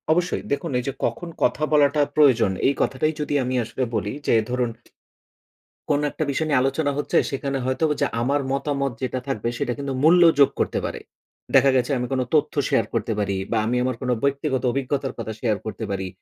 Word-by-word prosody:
অবশ্যই। 175 +2 0
দেখুন 140 +3 -1
এই - - -4
যে 135 - -1
কখন 145 +9 -3
কথা 125 +5 +1
বলাটা 145 0 +4
প্রয়োজন? 125 -9 +5 0.2
এই 140 - +3
কথাটাই 155 +4 0
যদি 150 - -2
আমি 130 +1 -2
আসলে 130 +4 -3
বলি 105 -1 -2
যে - - +4 0.2
ধরুন 125 -1 0 1.2
কোনো 145 0 +2
একটা - - -2
বিষয় 155 +3 -1
নিয়ে 140 -4 +3
আলোচনা 140 +3 0
হচ্ছে, 145 - 0
সেখানে 135 0 -2
হয়তো 130 +5 +1 0.2
যা - - +3
আমার 140 +4 +1
মতামত 140 0 -1
যেটা 130 0 -2
থাকবে, 120 -4 -2
সেটা 120 - -1
কিন্তু 140 -1 -3
মূল্য 175 +3 +6 0.2
যোগ 140 - +7
করতে - - 0
পারে। - - -4 0.6
দেখা 135 - +6
গেছে 130 +3 +1
আমি 125 0 -2
কোন 130 - +1
তথ্য 150 0 +2 0.2
শেয়ার 115 - +2
করতে 115 - -1
পারি 100 -1 0 0.2
বা 115 - +2
আমি 120 +3 0
আমার 130 -1 -1
কোন 130 - -3
বইক্তিগত 140 -1 0
অভিজ্ঞতার 135 +1 -2
কথা 110 -1 -4
শেয়ার 110 -4 0
করতে 110 +1 -5
পারি 95 -1 -2
135 Hz, 195 wpm, -23 LUFS, 125-145 Hz, 1.2 s, যোগ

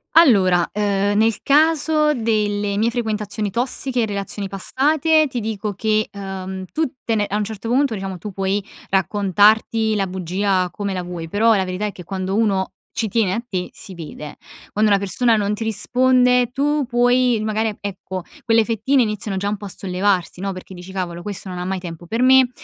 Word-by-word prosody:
Allora, 190 - +5
ehm, 205 -1 0
nel 225 -1 +2
caso 305 +1 +3
delle 210 -3 0
mie 225 +3 +2
frequentazioni 215 -3 -2
tossiche, 245 +1 -1
relazioni 200 0 -4
passate, 305 - +2
ti 250 - -3
dico 215 -2 -3
che, 215 +1 0
uhm, 190 -1 -6
tutte 260 -7 -2
ne 210 -2 +1
a 205 - -2
un 210 - +1
certo 220 +1 -6
punto 260 0 +2
diciamo 190 -2 -5
tu 205 +4 -7
puoi 195 +1 -1 0.3
raccontarti 205 +3 +3
la 195 -2 0
bugia 185 +1 0
come 200 -2 -3
la 180 -1 -3
vuoi, 175 -2 -6
però 225 +4 +3
la 195 - +2
verità 185 +3 -3
è 205 - -2
che 180 - -11
quando 190 +2 -3
uno 200 -4 +1 0.3
ci 220 - 0
tiene 205 -3 +1
a 235 - -3
te, 185 -4 -3
si 190 - -6
vede. 150 -3 -9 0.3
Quando 215 +1 +2
una 200 - +5
persona 225 +4 +2
non 205 0 0
ti 215 - -3
risponde, 250 +2 +3
tu 290 +3 +1
puoi 245 -1 +3
magari, 220 +1 0
e 210 - -7
ecco 190 -2 -6 0.2
quelle 225 -2 +3
fettine 240 +4 +2
iniziano 210 -2 -3
già 200 +1 -1
un 210 - -1
po' 205 - -9
a - - -6
sollevarsi, 185 -1 -1
no, 195 - -2
perché 185 0 -9
dici: 180 +1 -10
"Cavolo, 175 -2 -4
questo 200 0 -6
non 180 -1 -5
ha - - -3
mai 190 +1 -2
tempo 175 -2 -8
per 230 +7 0
me, 260 -1 +6
205 Hz, 190 wpm, -20 LUFS, 190-230 Hz, 0.3 s, me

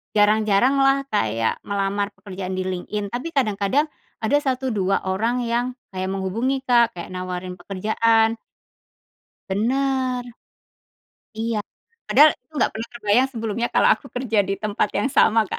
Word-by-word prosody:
jarang-jaranglah 220 +7 +3
kayak 115 - 0
melamar 200 0 -1
pekerjaan 190 -2 -6
di 185 - -1
LinkedIn 195 +2 -4
tapi 250 +7 -3
kadang-kadang 215 +2 +2 0.4
ada 285 +7 +3
1 265 -2 -1
2 195 -2 0
orang 225 +6 0
yang 235 +1 0 0.3
kayak 185 0 -3
menghubungi, 220 +8 -1
Kak, 235 -4 +3
kek 175 +1 -7
nawarin 180 0 -5
pekerjaan. 225 +4 +1 1.1
Benar. 255 +4 0 1.1
Iya, 220 -1 -2 0.4
padahal 300 +1 +7
aku 315 - -46
nggak - - +3
pernah 225 +1 -5
terbayang 240 +3 +2
sebelumnya 225 0 -2
kalau - - +4
aku - - -16
kerja 245 -3 -1
di 195 +1 -1
tempat 210 -1 0
yang 270 - 0
sama, 220 -5 +3
Kak - - -4
220 Hz, 135 wpm, -22 LUFS, 195-250 Hz, 1.1 s, padahal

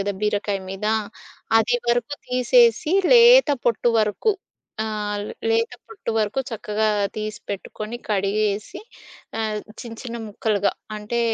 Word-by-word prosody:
గదా! 200 +1 -1
బీరకాయ 205 -1 0
మీద, 195 +2 -4 0.7
అది 235 +2 +2
వరకు 240 +3 +1
తీసేసి 315 - +4 0.2
లేత 485 -4 +8 0.2
పొట్టు 235 0 +2
వరకు, 215 - +1 0.5
ఆహ్, 210 -1 -3 0.3
లేత 460 +1 +1
పొట్టు 420 - -6
వరకు 215 +4 0
చక్కగా 215 -1 -1 0.3
తీసిపెట్టుకొని, 215 +1 -6
కడిగేసి, 205 +1 -1 0.6
ఆహ్, 215 -1 -1 0.2
చిన్న 235 -2 -8
చిన్న 235 -2 -6
ముక్కలుగా, 205 -1 0 0.2
అంటే 215 +3 -2
215 Hz, 110 wpm, -23 LUFS, 210-245 Hz, 0.7 s, లేత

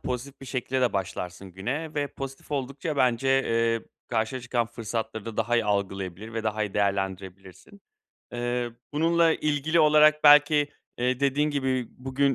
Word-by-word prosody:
pozitif 130 +2 -5
bir 135 - -10
şekilde 130 -1 0
başlarsın 95 -1 -4
güne 135 - -4
ve 145 -1 0
pozitif 135 +1 -8
oldukça 140 +2 -3
bence, 130 0 +2
eee, 115 -4 +2 0.3
karşına 115 +3 -1
çıkan 120 -1 -1
fırsatları 115 -2 -5
da 115 -2 -7
daha 120 +2 +1
iyi 115 - +2
algılayabilir 100 0 -2
ve 115 - -2
daha 110 0 0
iyi 105 -2 -4
değerlendirebilirsin. 95 - -3 0.5
Eee, 120 0 -2 0.2
bununla 165 +2 +3
ilgili 155 +2 +1
olarak 150 0 +5
belki, 145 0 +7 0.3
eee, 125 +1 0
dediğin 140 +2 +2
gibi, 130 -4 -1
"Bugün, 135 +1 0
125 Hz, 145 wpm, -26 LUFS, 110-145 Hz, 0.5 s, belki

